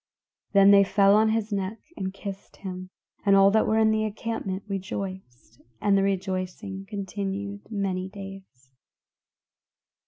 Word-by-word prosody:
Then 200 Hz, 0 st, +7 dB
they 200 Hz, 0 st, +8 dB
fell 195 Hz, 0 st, +4 dB
on 220 Hz, +1 st, +4 dB
his 220 Hz, -1 st, -1 dB
neck 195 Hz, +2 st, -2 dB, 0.2 s
and 190 Hz, 0 st, -3 dB
kissed 195 Hz, 0 st, -8 dB
him; 185 Hz, -1 st, -7 dB, 0.3 s
and 200 Hz, -1 st, +5 dB
all 195 Hz, 0 st, +6 dB
that 220 Hz, +1 st, +3 dB
were 220 Hz, -, +2 dB
in 220 Hz, 0 st, +4 dB
the 215 Hz, 0 st, +1 dB
encampment 215 Hz, -3 st, -3 dB
rejoiced, 190 Hz, -, -6 dB, 0.2 s
and 200 Hz, -1 st, +3 dB
the 195 Hz, -, +4 dB
rejoicing 190 Hz, 0 st, -3 dB
continued 200 Hz, 0 st, -5 dB
many 190 Hz, -3 st, -2 dB
days. 195 Hz, -10 st, -11 dB
195 Hz, 135 wpm, -26 LUFS, 190-205 Hz, 0.3 s, they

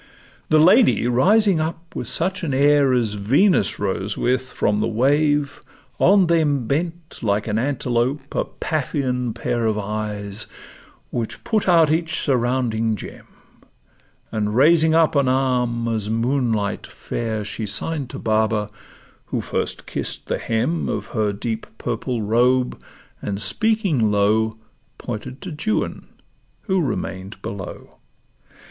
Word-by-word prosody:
The 155 Hz, -, +5 dB
lady 185 Hz, -, +5 dB
rising 185 Hz, -, +4 dB
up 165 Hz, +1 st, -4 dB
with -, -, -4 dB
such 185 Hz, +3 st, -1 dB
an 145 Hz, -5 st, -1 dB
air 140 Hz, 0 st, +4 dB
As 120 Hz, -4 st, +1 dB
Venus 135 Hz, -, +2 dB
rose 100 Hz, 0 st, -2 dB
with 130 Hz, +1 st, 0 dB
from 105 Hz, 0 st, 0 dB
the 110 Hz, -, +1 dB
wave, 145 Hz, +5 st, +1 dB, 0.4 s
on 195 Hz, 0 st, +5 dB
them 155 Hz, -6 st, +2 dB
Bent 165 Hz, +5 st, -3 dB
like 105 Hz, -2 st, 0 dB
an 110 Hz, 0 st, 0 dB
antelope 135 Hz, +1 st, -1 dB
a -, -, 0 dB
Paphian 130 Hz, -5 st, -2 dB
pair 115 Hz, 0 st, -1 dB
Of 110 Hz, -1 st, 0 dB
eyes, 105 Hz, 0 st, -4 dB, 0.6 s
which 115 Hz, -2 st, -4 dB
put 215 Hz, -4 st, 0 dB
out 165 Hz, -3 st, +5 dB
each 160 Hz, 0 st, 0 dB
surrounding 120 Hz, -4 st, 0 dB
gem; 100 Hz, -, -10 dB, 1.0 s
And 105 Hz, -1 st, -1 dB
raising 160 Hz, +4 st, +5 dB
up 165 Hz, -1 st, +3 dB
an 140 Hz, -2 st, +3 dB
arm 125 Hz, -3 st, +1 dB
as 110 Hz, -2 st, -2 dB
moonlight 115 Hz, -3 st, 0 dB
fair, 110 Hz, -3 st, -4 dB
She 110 Hz, +1 st, -3 dB
sign'd 140 Hz, +6 st, -2 dB
to -, -, -7 dB
Baba, 110 Hz, -1 st, 0 dB, 0.5 s
who -, -, -3 dB
first -, -, -3 dB
kiss'd -, -, -5 dB
the -, -, -1 dB
hem 120 Hz, +9 st, -1 dB
Of -, -, -2 dB
her 110 Hz, -3 st, +1 dB
deep 110 Hz, +2 st, -4 dB
purple 120 Hz, -4 st, -3 dB
robe, 125 Hz, +4 st, +2 dB, 0.4 s
and 100 Hz, -1 st, -3 dB
speaking 195 Hz, -, +1 dB
low, 110 Hz, +2 st, +2 dB, 0.4 s
Pointed 125 Hz, +3 st, -6 dB
to 190 Hz, -, -6 dB, 0.3 s
Juan -, -, -5 dB, 0.5 s
who 190 Hz, -3 st, 0 dB
remain'd 95 Hz, -, -4 dB
below. 100 Hz, -2 st, -8 dB
125 Hz, 130 wpm, -21 LUFS, 110-155 Hz, 1.0 s, The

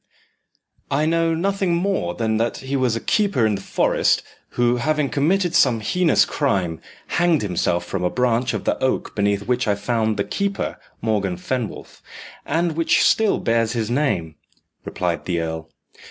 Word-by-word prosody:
"I 145 Hz, +3 st, +1 dB
know 165 Hz, 0 st, +2 dB
nothing 195 Hz, 0 st, 0 dB
more 175 Hz, -, -1 dB
than 110 Hz, -1 st, 0 dB
that 115 Hz, +1 st, -1 dB
he 135 Hz, +1 st, -4 dB
was 130 Hz, -4 st, +1 dB
a -, -, -1 dB
keeper 200 Hz, -, +1 dB
in 110 Hz, -, +2 dB
the 100 Hz, -, -3 dB
forest, -, -, +1 dB, 0.3 s
who, 120 Hz, 0 st, +3 dB
having 150 Hz, +2 st, 0 dB
committed 175 Hz, +5 st, +1 dB
some 125 Hz, -8 st, +4 dB
heinous 170 Hz, +10 st, +3 dB
crime, 90 Hz, -, -1 dB, 0.2 s
hanged 170 Hz, -6 st, +1 dB
himself 90 Hz, -2 st, 0 dB
from 95 Hz, -2 st, -3 dB
a 90 Hz, -, +2 dB
branch 125 Hz, +1 st, 0 dB
of -, -, -4 dB
the -, -, -1 dB
oak 130 Hz, -, -1 dB
beneath 100 Hz, 0 st, 0 dB
which 125 Hz, -1 st, 0 dB
I 105 Hz, -, +2 dB
found 110 Hz, +1 st, -1 dB
the 100 Hz, -, +1 dB
keeper, 200 Hz, -, -3 dB, 0.2 s
Morgan 100 Hz, -5 st, 0 dB
Fenwolf, 120 Hz, +5 st, -5 dB, 0.5 s
and 165 Hz, +3 st, +1 dB
which 165 Hz, 0 st, +3 dB
still 220 Hz, -2 st, +3 dB
bears 115 Hz, -1 st, +1 dB
his 115 Hz, -2 st, -2 dB
name," 120 Hz, -, 0 dB, 0.5 s
replied -, -, -2 dB
the 85 Hz, -2 st, -1 dB
earl. 80 Hz, -1 st, -4 dB
120 Hz, 165 wpm, -21 LUFS, 105-160 Hz, 0.5 s, some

